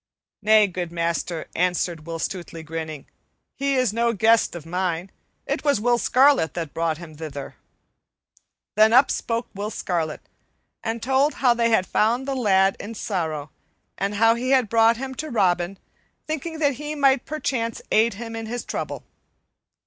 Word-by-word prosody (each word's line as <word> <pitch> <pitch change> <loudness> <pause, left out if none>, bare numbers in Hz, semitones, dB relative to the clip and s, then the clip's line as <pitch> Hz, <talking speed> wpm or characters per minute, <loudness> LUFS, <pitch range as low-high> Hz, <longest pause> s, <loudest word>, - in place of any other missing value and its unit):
"Nay, 215 0 +6
good 180 -3 -4
master," 170 -1 -2
answered 175 -2 -1
Will 165 0 -4
Stutely, 170 -1 -5
grinning, 160 -2 -6 0.5
"he 275 0 -1
is 255 -5 +2
no 235 +1 +1
guest 220 -1 +3
of 165 -3 -8
mine; 180 +1 -2 0.3
it - - -2
was 285 -6 +2
Will 240 +2 +2
Scarlet 265 - +4
that 165 -4 -4
brought 165 -1 -1
him 160 -3 -11
thither." 145 -3 -7 1.2
Then 215 +2 +5
up 260 +3 +6
spoke 230 0 -2
Will 205 +1 -4
Scarlet, 170 -7 -3 0.6
and 225 0 -3
told 270 +4 +2
how 250 -3 +4
they 235 -1 +1
had 220 -5 +3
found 240 +8 +1
the 275 - -1
lad 195 -6 +3
in 225 +2 -7
sorrow, 160 -8 -3 0.4
and 200 +1 -2
how 225 +2 +5
he 245 +2 -3
had 260 -5 +3
brought 230 0 +4
him 265 +1 -5
to 310 +4 -5
Robin, 185 -5 +1 0.5
thinking 315 +1 -4
that 290 -3 +2
he 300 +1 -4
might 275 -3 +3
perchance 250 -7 -2
aid 220 0 +3
him 230 +1 -7
in 225 -1 -5
his 240 +1 -4
trouble. - - -4
220 Hz, 165 wpm, -23 LUFS, 175-245 Hz, 1.2 s, Nay